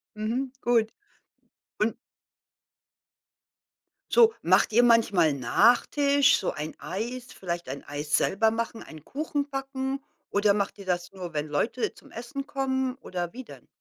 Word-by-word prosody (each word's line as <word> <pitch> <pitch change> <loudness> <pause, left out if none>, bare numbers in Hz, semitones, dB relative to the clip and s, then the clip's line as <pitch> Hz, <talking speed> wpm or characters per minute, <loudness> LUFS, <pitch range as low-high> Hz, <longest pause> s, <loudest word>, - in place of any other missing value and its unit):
Mhm, 235 +5 -2
gut. 230 -2 +3 0.9
Und 215 +2 +1 2.2
So, 455 -2 +6
macht - - +3
ihr 240 +3 +6
manchmal 210 -9 +4
Nachtisch, 275 - +4
so - - -1
ein 155 0 -6
Eis? 245 +6 -5
Vielleicht 175 -3 -4
ein 140 +2 -6
Eis 145 +1 -1
selber 220 +3 +2
machen, 230 0 -3
einen 155 -1 -12
Kuchen 290 0 -3
backen? 270 0 -3 0.3
Oder 205 0 +3
macht 200 0 -1
ihr 200 - -10
das 175 -1 -2
nur, 180 -3 -7
wenn 150 0 -2
Leute 220 +12 -1
zum - - -18
Essen 275 +4 -6
kommen 265 -2 -1
oder 175 -9 -5
wie 260 - -7
denn? - - -14
230 Hz, 140 wpm, -27 LUFS, 180-265 Hz, 2.2 s, So